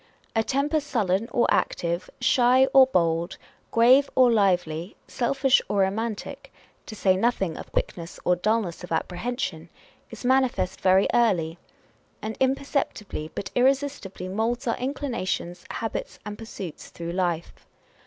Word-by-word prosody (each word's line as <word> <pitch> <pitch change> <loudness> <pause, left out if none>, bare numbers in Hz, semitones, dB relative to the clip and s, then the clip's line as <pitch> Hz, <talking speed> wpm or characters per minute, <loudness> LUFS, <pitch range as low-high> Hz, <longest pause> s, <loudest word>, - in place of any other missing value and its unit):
A 225 - +3
temper 285 +6 +1
sullen 225 -7 -1
or 240 - +3
active, 170 +1 0
shy 255 +1 +4
or 265 -1 +8
bold, 170 -4 0 0.3
grave 255 +5 +5
or 255 -2 +6
lively, 180 -5 +1
selfish 270 +1 +2
or 200 -1 +2
romantic 225 +7 -3 0.4
(to 215 - -7
say 190 -3 +3
nothing 195 -5 0
of - - -9
quickness 170 -1 -3
or 180 - +4
dullness 195 -2 -1
of 180 - -9
apprehension) 245 - -3 0.4
is - - -9
manifest 260 -7 +1
very 190 +1 +4
early; 175 -8 +2 0.6
and 220 0 -5
imperceptibly 265 - -1
but - - -5
irresistibly 260 -8 0
moulds 225 +5 -1
â€¢our 230 - -1
inclinations, 235 -10 -3
habits, 225 - -4
and 210 0 -5
pursuits 200 -7 -8
through 170 0 -6
life. 175 -2 -1
220 Hz, 130 wpm, -25 LUFS, 180-255 Hz, 0.6 s, or